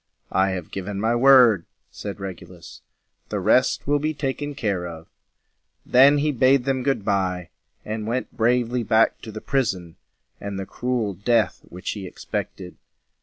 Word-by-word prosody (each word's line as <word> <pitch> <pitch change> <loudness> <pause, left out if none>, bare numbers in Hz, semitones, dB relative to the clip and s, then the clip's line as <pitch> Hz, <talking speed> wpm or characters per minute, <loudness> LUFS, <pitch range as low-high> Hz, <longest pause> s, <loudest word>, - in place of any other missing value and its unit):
"I 95 +1 +2
have 90 -3 -5
given 100 +1 -5
my 115 +3 +1
word," 120 -7 +6 0.3
said 100 -1 -7
Regulus. 90 -2 -9 0.5
"The - - -2
rest - - +2
will 145 +1 +2
be 155 +1 -2
taken 145 +1 -3
care 100 -8 -2
of." 80 -1 -9 0.8
Then 135 +3 +6
he 150 +1 +1
bade 130 0 +3
them 135 -1 0
good 125 -6 -1
by, 90 -3 -1 0.4
and 110 0 -4
went 125 +3 -3
bravely 120 +1 +1
back 110 0 +2
to 110 - -8
the 110 0 -8
prison 95 -11 -2 0.4
and 100 -1 -5
the 95 - -4
cruel 120 -2 -2
death 110 +4 +1
which 90 +1 -5
he 100 -3 -6
ex - - -12
pect - - -4
ed. 90 -1 -10
110 Hz, 165 wpm, -23 LUFS, 95-130 Hz, 0.8 s, word